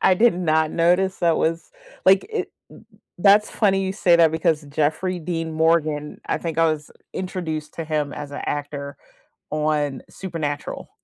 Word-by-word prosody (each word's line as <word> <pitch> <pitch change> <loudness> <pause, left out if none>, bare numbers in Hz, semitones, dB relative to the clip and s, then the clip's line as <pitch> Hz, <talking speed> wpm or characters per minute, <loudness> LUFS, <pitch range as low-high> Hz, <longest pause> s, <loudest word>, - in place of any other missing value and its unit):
I 185 - +5
did 230 +1 +4
not 160 -3 +1
notice 180 +3 +2
that 170 -2 +2
was 165 +1 -1 0.3
like, 190 0 +5
it 445 - -3 0.2
eh, - - -13 0.4
that's 205 +3 +5
funny 195 -3 +2
you 190 0 -1
say 175 -4 +4
that 165 -2 +5
because 160 -1 0
Jeffrey 160 +5 0
Dean 165 -1 -3
Morgan, 155 -2 +1
I - - 0
think 165 -1 -4
I 165 - +5
was 150 -1 -5 0.2
introduced 170 -5 -4
to 165 - -4
him 150 -2 -1
as 145 -1 -7
an 145 - -6
actor 145 -1 -4 0.6
on 150 -3 0
Supernatural. 160 -6 -5
160 Hz, 165 wpm, -22 LUFS, 150-180 Hz, 0.6 s, I